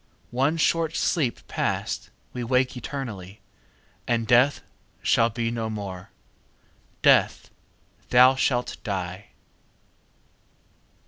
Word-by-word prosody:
One 135 +6 +1
short 165 0 +1
sleep 140 -9 -1
past, - - -2 0.2
we 125 - -4
wake 125 +2 +1
eternally, 110 -7 -6 0.7
And 115 -1 0
Death 125 +5 +3 0.4
shall 115 0 +3
be 115 0 -2
no 115 -1 -3
more: 100 -4 -6 0.9
Death, - - +3 0.6
thou 125 +1 +7
shalt 125 -2 0
die! 95 -1 -4
120 Hz, 90 wpm, -25 LUFS, 110-130 Hz, 0.9 s, thou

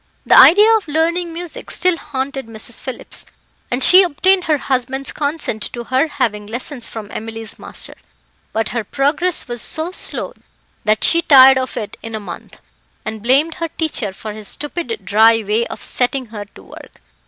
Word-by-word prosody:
The - - +5
idea 425 +6 +8
of 415 - -8
learning 335 +3 0
music 340 0 -8
still 365 -1 +1
haunted 270 -4 -5
Mrs. 225 +1 -6
Phillips, 260 - -5 0.5
and 250 +2 +1
she 370 +1 +8
obtained 370 +2 +2
her 310 -2 +2
husband's 265 0 -2
consent 285 -8 -3
to 240 - -5
her 260 +6 +1
having 210 -8 -2
lessons 240 +2 -2
from 215 -2 -8
Emily's 225 0 -7
master; - - -6 0.6
but 225 0 -1
her 235 -2 -3
progress 290 - +1
was 240 -2 -3
so 320 +3 -1
slow - - -1 0.5
that 215 0 +1
she 335 - +4
tired 265 -4 +7
of 260 - -5
it 210 -3 -6
in 225 -1 -6
a - - -4
month, 185 -5 -10 0.5
and 220 -1 -5
blamed 275 +8 +2
her 330 - 0
teacher 310 - -3
for 210 +2 -8
his 215 -1 -8
stupid 345 - -5
dry 225 +2 +4
way 215 +3 0
of - - -8
setting 255 +1 -1
her 205 -1 -6
to 205 - -17
work. - - -14
265 Hz, 175 wpm, -17 LUFS, 225-320 Hz, 0.6 s, idea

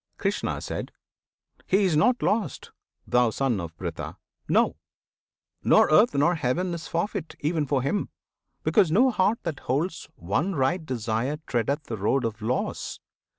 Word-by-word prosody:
Krishna. - - -1 1.1
He 195 +2 +3
is 180 -5 +2
not 240 +11 +3
lost, 215 0 -1 0.3
thou 125 -1 +3
Son 120 -2 0
of 85 -1 -8
Pritha! 80 -3 -5 0.3
No! - - +3 0.9
Nor - - +5
earth, 210 +6 +5
nor 150 +5 +4
heaven 170 +4 -1
is 170 -1 -6
forfeit, 170 0 -3
even 155 -1 0
for 135 -2 +1
him, 145 +10 -1 0.5
Because 200 -7 +4
no 250 +9 +5
heart 210 +1 +2
that 155 -5 -3
holds 160 +7 -2
one 145 - -1
right 160 +6 +1
desire 125 +1 -2
Treadeth 140 +5 -1
the 115 -5 -5
road 115 +6 +1
of 110 -1 -4
loss! 120 +4 -2
145 Hz, 145 wpm, -26 LUFS, 120-180 Hz, 1.1 s, Nor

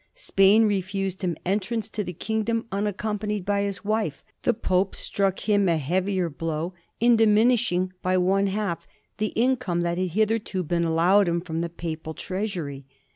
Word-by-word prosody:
Spain 215 - +4
refused 195 -1 -1
him 175 -4 -1
entrance 205 +3 -1
to 215 -1 -3
the 180 - -5
kingdom 220 +5 -1
unaccompanied 210 0 -2
by 200 0 +1
his 200 0 -3
wife; 215 -8 -1 0.2
the - - +3
Pope 185 -1 0
struck 195 -1 -1
him 205 -3 +2
a 165 - +3
heavier 185 +5 0
blow 165 +2 -3 0.3
in 235 0 +5
dimin 220 +2 +5
ishing 185 -6 0
by 185 0 +1
one 195 +2 +2
half 195 -3 -2 0.3
the 215 - +1
income 240 -8 +1
that 175 +1 -1
had 185 - +1
hitherto 210 0 0
been 170 +1 0
allow 165 +5 +4
ed 200 - +3
him 170 0 +1
from 165 -2 -4
the 170 - -2
Papal 160 -2 -6
treasury. 175 -9 -4
195 Hz, 170 wpm, -25 LUFS, 175-210 Hz, 0.3 s, in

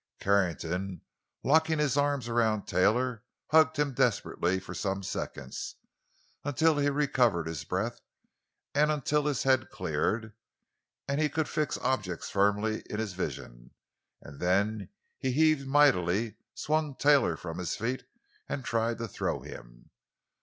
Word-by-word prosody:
Carrington, 90 -2 0 0.4
locking 160 +2 +3
his 150 -3 +1
arms 145 -3 +1
around 115 -3 +1
Taylor, 115 +4 +1 0.3
hugged 155 -1 +5
him 145 -2 +1
desperately 95 -5 +1
for 90 -2 -9
some 95 +2 -2
seconds—until 145 - -3
he 145 0 +3
recovered 130 - +2
his 80 -3 -4
breath, - - -3 0.7
and 150 +1 +3
until 150 0 +1
his 145 -4 0
head 130 -2 +2
cleared, 110 0 -2 0.7
and 140 +2 0
he 155 - +2
could 160 +1 -1
fix 155 -2 -1
objects 95 -10 -2
firmly 105 +2 +1
in 105 - -3
his 110 -4 -3
vision; - - -6 0.5
and 70 -1 -11
then 100 +3 +1 0.3
he 130 - 0
heaved 155 -1 +3
mightily, 115 -7 +3 0.2
swung 155 -2 -1
Taylor 140 - +4
from 80 0 -6
his 90 - -2
feet 125 +4 -2 0.5
and 135 - -3
tried 115 0 0
to 115 0 -4
throw - - -2
him. - - -12
115 Hz, 130 wpm, -29 LUFS, 95-145 Hz, 0.7 s, hugged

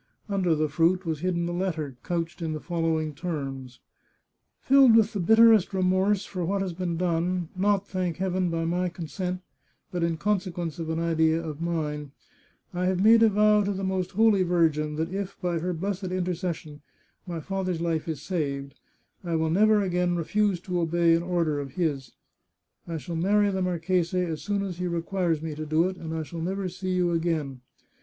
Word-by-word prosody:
Under 190 -5 +1
the 155 0 +1
fruit 170 +5 +2
was 160 -2 -2
hidden 170 0 -1
a - - -3
letter, 165 -6 -2
couched 170 -1 -3
in 160 -1 -2
the 155 - -4
following 165 -2 -1
terms: 135 -6 -5 0.4
" - - -53
Filled 265 -3 +6
with 225 0 +4
the 205 - -2
bitterest 220 0 +5
remorse 190 +2 +2
for 180 -2 -4
what 195 +3 0
has 185 -3 -3
been 175 -1 -3
done 175 0 0
— - - -32
not, 200 +1 +1
thank 180 -3 -2
Heaven, 185 -1 0
by 165 0 -1
my 180 +2 0
consent, 180 +2 -4 0.5
but 175 -2 -2
in 170 -1 0
conse 195 +1 0
quence 170 -1 -5
of 160 -1 -4
an 160 - -1
idea 160 -1 +2
of 160 -2 -6
mine 150 -4 -3 0.3
— - - -38
I 180 +1 -1
have 185 -1 +1
made 225 +1 +7
a 225 - +7
vow 210 0 +4
to 200 - -1
the 195 0 -4
Most 190 -1 -2
Holy 215 -1 +4
Virgin 160 -4 +1
that 165 +3 -2
if, 195 0 -4
by 175 -2 -1
her 180 +3 -2
blessed 190 +3 -3
intercession, 180 -4 -3 0.5
my 170 -2 -4
father's 185 0 -2
life 165 -2 -1
is 155 -3 -4
saved, 140 -6 -3 0.5
I 170 -2 -2
will 160 0 +1
never 210 +3 +4
again 180 -1 0
refuse 195 +3 +1
to 180 -2 -2
obey 170 0 +3
an 165 - +3
order 170 -4 0
of 135 -2 -6
his. 145 -8 -2 0.7
I 165 -1 -3
shall 170 +2 -6
marry 200 +4 +2
the 190 -1 -2
marchese 180 0 0
as 165 -3 -3
soon 205 -1 -1
as 180 -3 -5
he 180 - -1
requires 170 -2 -1
me 160 -1 -3
to 155 +1 -5
do 160 +3 +3
it, 185 0 -5
and 160 -2 -6
I 160 - -2
shall 165 +2 -7
never 190 +3 -2
see 185 +1 -3
you 180 -1 +2
again. 160 -6 -1
175 Hz, 200 wpm, -26 LUFS, 160-190 Hz, 0.7 s, made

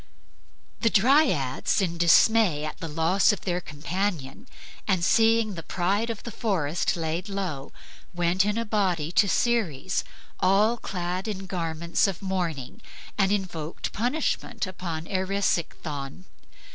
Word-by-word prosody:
The 230 - +3
Dryads 220 - +3
in 170 -4 -1
dismay 175 -2 +4
at 155 - -6
the 165 - -5
loss 165 +7 +3
of 205 - -4
their 180 -1 -1
companion 170 - -4 0.4
and 190 -4 +2
at - - +1
seeing 225 -1 +3
the 170 - -6
pride 195 +7 -1
of 225 -3 -5
the 235 - -6
forest 175 -9 0
laid 165 +4 -3
low, 180 -9 -4 0.4
went 175 +1 +2
in 210 +2 0
a 230 - -1
body 185 -7 0
to 200 +2 +3
Ceres, 185 - 0 0.4
all 210 +5 +3
clad 180 -1 -4
in 195 -3 -4
garments 170 -1 0
of 190 -4 -3
mourning, 180 - -3 0.3
and 195 -1 +2
invoked 175 -6 -3
punishment 245 -1 -1
upon 170 -4 -5
Erisichthon. 185 -6 -2
185 Hz, 135 wpm, -26 LUFS, 165-210 Hz, 0.4 s, dismay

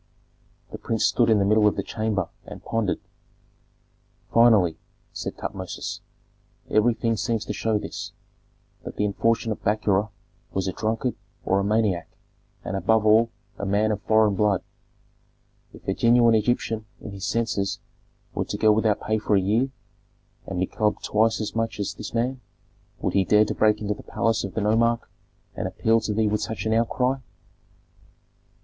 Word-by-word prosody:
The - - -7
prince 115 -1 0
stood 120 -2 +3
in 110 - +5
the 100 - +2
middle 105 +1 +4
of 105 - +2
the 100 - -2
chamber 105 -4 -2 0.2
and - - -10
pondered. 115 -4 -1 1.3
"Finally," 110 -9 +5 0.3
said - - -5
Tutmosis, - - -5 0.7
"everything 115 +1 +2
seems 110 +1 -1
to - - -3
show 110 -1 0
this, - - -6 0.7
that - - -7
the 105 - 0
unfortunate 110 +2 0
Bakura 105 0 +1 0.4
was 95 -1 -1
a - - 0
drunkard 115 +3 -1 0.3
or 95 - +2
a - - 0
maniac, 105 -4 +1 0.6
and, - - -3
above 110 +3 +2
all, 110 +2 +5 0.3
a 100 - -3
man 105 +2 +2
of 105 -1 -2
foreign 110 -1 +3
blood. 100 -2 +1 1.1
If - - -16
a - - +1
genuine 120 0 +4
Egyptian 110 -1 0
in 105 - -8
his 100 -1 -5
senses 110 -4 -1 0.6
were - - -1
to - - -4
go 110 - +5
without 105 -1 +2
pay 110 0 0
for 105 0 +1
a - - +5
year, 110 +8 +1 0.8
and 95 - -4
be 95 - +2
clubbed 105 +2 -1
twice 110 +1 +2
as 110 0 -4
much 115 -1 -2
as 100 - -2
this - - -7
man, 125 +2 -1 0.6
would - - -1
he 100 - +4
dare 105 +3 +4
to - - -2
break 105 0 +3
into 105 -1 -1
the 105 - -11
palace 115 -1 0
of 100 - -6
the 110 - 0
nomarch 115 +3 +2 0.5
and - - -3
appeal 115 0 +2
to 110 -1 -2
thee 110 0 +2
with 105 0 0
such 110 -3 -4
an 110 - +1
outcry?" 125 +3 +1
110 Hz, 170 wpm, -25 LUFS, 105-115 Hz, 1.3 s, in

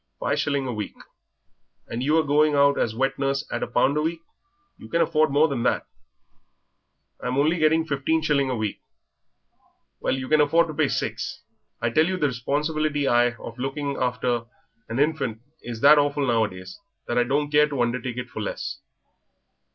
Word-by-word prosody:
"Five - - 0
shillings 140 -2 0
a 125 - -3
week." 105 -2 -5 0.9
"And 115 - -4
you 150 +5 +2
a 160 - +4
going 150 +1 +3
out 140 0 +4
as 110 - 0
wet 135 +2 -1
nurse 135 +1 0
at 120 - -2
a - - -1
pound 135 +4 +2
a - - +2
week; 165 +1 -2 0.6
you - - -12
can 170 - 0
afford 155 -1 +3
more 145 +3 +4
than 135 -6 -3
that." - - +1 1.3
"I'm 125 +1 -3
only 155 +4 +2
getting 160 +1 +3
fifteen 155 +2 0
shillings 140 -3 +1
a 130 - -1
week." 110 -3 -3 1.2
"Well, - - 0
you 130 -1 -5
can 155 +1 +4
afford 165 +3 +3
to - - -4
pay - - +2
six. - - -3 0.4
I 120 - +1
tell 155 +7 +3
you 185 0 -1
the 155 - +1
responsibility 145 +3 -1
I 120 0 +3
of 115 +1 -10
looking 140 +2 -3
after 125 -2 -1 0.4
a - - -4
hinfant 140 -5 0 0.2
is 120 -2 -7
that 145 +1 +8
awful 145 0 +1
nowadays 110 - -1 0.3
that 120 +1 0
I - - +4
don't 145 +4 -1
care 150 0 +4
to 140 -4 0
undertake 125 0 -3
it 125 -1 -5
for 110 - -5
less." 105 - -4
140 Hz, 185 wpm, -24 LUFS, 120-150 Hz, 1.3 s, that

